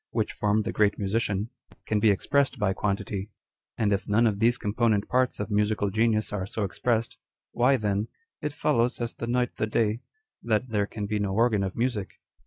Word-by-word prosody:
which - - -1
form 105 +1 +1
the - - -2
great 105 -1 +2
musician, 105 +1 -1 0.3
can 105 - +1
be 110 +1 +4
expressed 140 +8 +1
by 95 -2 +1
quantity; 100 0 -2 0.5
aud 105 -2 +2
if 100 - -2
none 110 +3 +3
of 105 -3 +1
these 120 +2 +3
component 105 -1 +1
parts 130 0 +1
of 105 +1 -4
musical 105 -1 +1
genius 110 0 +1
are 95 -2 -2
so 110 - -3
expressed, 115 +3 -1 0.3
why 130 +3 +3
then 105 -1 -1 0.2
" 460 - -64
it 150 - -2
follows, 125 -4 +1
as 120 -1 -3
the 115 - -6
night 125 0 0
the 110 - 0
day," 110 +1 0 0.4
that 115 +2 0
there 105 -2 0
can 105 -1 -5
be 105 +1 -1
no 100 -1 -1
organ 115 -2 +3
of 95 -1 -3
music. 115 -5 -1
110 Hz, 195 wpm, -27 LUFS, 105-115 Hz, 0.5 s, be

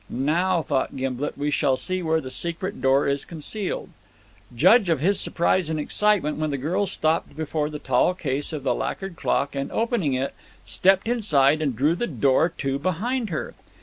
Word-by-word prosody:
"Now," 170 +6 +1
thought 135 -2 -1
Gimblet, 130 +2 -3
"we 145 +1 -1
shall 135 -2 +2
see 185 +4 -2
where 160 -1 +1
the 130 -4 -7
secret 170 +8 -2
door 135 +1 +3
is 140 0 0
concealed." 180 +5 -4 0.7
Judge 190 - +5
of 165 - +2
his 190 +7 +2
surprise 170 0 +1
and 160 -1 -1
excitement, 180 -2 +1
when 155 0 -1
the 140 - -2
girl 175 +9 -1
stopped 160 -1 -1
before 155 -1 -2
the 150 - -6
tall 135 +5 +1
case 145 -5 -2
of 150 -4 -5
the 130 -3 +1
lacquered 195 +7 -4
clock 140 -2 -1
and, 140 0 -3
opening 225 - 0
it, 130 +2 -2 0.3
stepped 190 +2 +2
inside 155 - +3
and 140 -6 -1
drew 145 +8 +2
the 240 +8 -2
door 140 +4 +2
to 135 -4 -3
behind 215 - -1
her. 160 - -4
155 Hz, 180 wpm, -24 LUFS, 140-185 Hz, 0.7 s, Judge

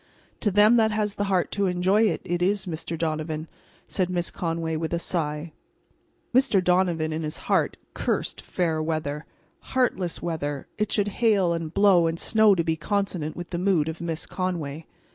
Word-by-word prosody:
"To 210 - +1
them 210 +4 +5
that 220 -1 +4
has 210 -1 -1
the 205 - -2
heart 190 -3 +1
to 200 -1 +1
enjoy 190 +5 +3
it, - - -3
it 175 0 -1
is, 195 +2 +1
Mr. 165 -1 -4
Donovan," 155 0 -2 0.4
said 185 -2 -1
Miss 175 -1 -1
Conway, 165 -1 -2
with 160 +1 -2
a - - 0
sigh. 160 -2 -2 0.8
Mr. 255 -5 +4
Donovan, 175 -3 +2
in 160 - -2
his 155 -1 -4
heart, - - +1 0.2
cursed - - -2
fair 160 -3 -1
weather. 155 -1 -2 0.3
Heartless 195 -9 -1
weather! 145 -4 -3
It 210 -1 0
should 205 -1 +2
hail 200 -7 +4
and 165 -2 -3
blow 190 -3 +5
and 165 +1 -2
snow 215 -2 +5
to 170 - +1
be 160 -1 0
consonant 180 -2 -2
with 175 0 -7
the 170 - -2
mood 180 -5 +2
of 160 +1 -5
Miss 165 -2 -3
Conway. 165 -5 -4
175 Hz, 180 wpm, -25 LUFS, 160-200 Hz, 0.8 s, them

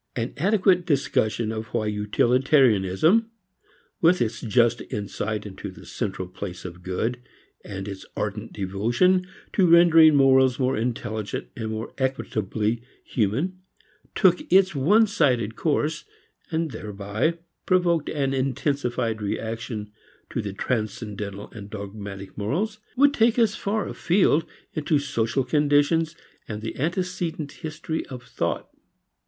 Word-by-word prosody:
An 115 0 -2
adequate 185 0 +3
discussion 115 -6 +1
of 110 0 -4
why 110 -2 +1
utilitarianism 120 - +3 0.7
with 175 +1 +5
its 115 -2 -1
just 120 0 +2
insight 105 +1 -3
into 100 -2 -7
the - - -13
central 95 - -4
place 90 0 -7
of 90 0 -8
good, 110 +7 -2 0.4
and 95 -1 -6
its 100 -1 -6
ardent 105 +2 -3
devotion 120 - +1 0.3
to 190 -3 +4
rendering 165 -2 +7
morals 130 -2 +5
more 130 0 +1
intelligent 110 - -3
and 110 -1 -4
more 110 +1 -5
equitably 115 -4 -1 0.2
human 135 - -1 0.6
took 180 -3 +3
its 190 +1 +6
onesided 145 - +3
course 155 +1 0 0.5
(and 160 -2 -1
thereby 105 +10 -2 0.3
provoked 175 -4 +2
an 135 -3 0
intensified 130 -4 -1
reaction 110 0 -4 0.4
to - - -1
transcendental 105 -2 -3
and 100 -3 -9
dogmatic 100 -2 -7
morals) 185 - -2 0.2
would 285 +1 +5
take 235 -2 +3
us 225 -3 +4
far 215 0 -2
afield 170 -3 +2 0.3
into 155 -1 +1
social 135 -3 0
conditions 150 +4 +2 0.3
and 105 -1 -6
the 110 - -4
antecedent 170 -1 -2
history 160 0 -4
of 125 -2 -8
thought. - - -3
125 Hz, 120 wpm, -25 LUFS, 105-165 Hz, 0.7 s, rendering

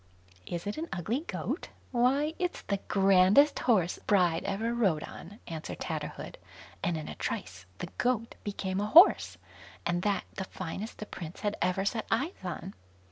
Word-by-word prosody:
"Is 170 +1 -4
it 205 +8 -3
an 330 - -4
ugly 200 - -1
goat? - - -3 0.2
why, 270 +5 +2
it's 360 -1 -2
the 200 - -1
grandest 195 +8 +5
horse 190 -8 +2
bride 180 -5 +2
ever 210 +4 -1
rode 195 -10 +2
on", 205 +6 -10
answered 160 -2 -6
Tatterhood; - - -5 0.4
and 175 -4 0
in 155 - -6
a - - -5
trice 90 -1 -5
the - - -5
goat 245 -2 +1
became 195 -1 -2
a 205 - 0
horse, 335 - +7 0.5
and 175 +1 +1
that 200 0 +1
the 190 - -4
finest 190 +5 -6
the 215 - -6
prince 170 -4 -8
had 205 0 0
ever 185 +2 +1
set 220 +2 -1
eyes 280 +11 +1
on. 185 +2 -5
200 Hz, 165 wpm, -30 LUFS, 180-235 Hz, 0.5 s, horse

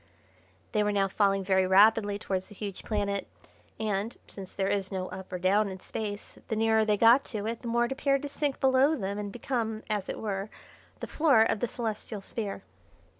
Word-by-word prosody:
They 210 - +2
were 210 0 +1
now 200 -1 +2
falling 195 0 +1
very 190 -1 +2
rapidly 205 +1 +5
towards 190 -2 -3
the 205 - -14
huge 200 -2 -6
planet, 200 -2 -2 0.5
and, 215 +1 -2
since 190 -2 -10
there 195 -1 0
is 195 -2 -1
no 185 -1 -3
up 190 0 -9
or 180 - -2
down 200 +3 +2
in 190 -1 -7
Space, 205 +1 -6
the 220 - -1
nearer 220 0 +3
they 210 -1 +2
got 235 +5 +6
to 210 -3 -4
it 230 +1 -3
the 245 - -7
more 235 +1 +2
it 240 - -5
appeared 275 +1 +1
to - - -2
sink 285 -1 -2
below 265 +3 +4
them 200 -5 -3
and 205 -1 -4
become, 225 -2 -3
as 205 -3 -2
it - - -3
were, 200 -1 -3 0.5
the - - -2
floor 280 -8 +4
of 225 - 0
the 245 - 0
Celestial 220 -2 -4
Sphere. 200 -1 -5
210 Hz, 205 wpm, -29 LUFS, 195-230 Hz, 0.5 s, got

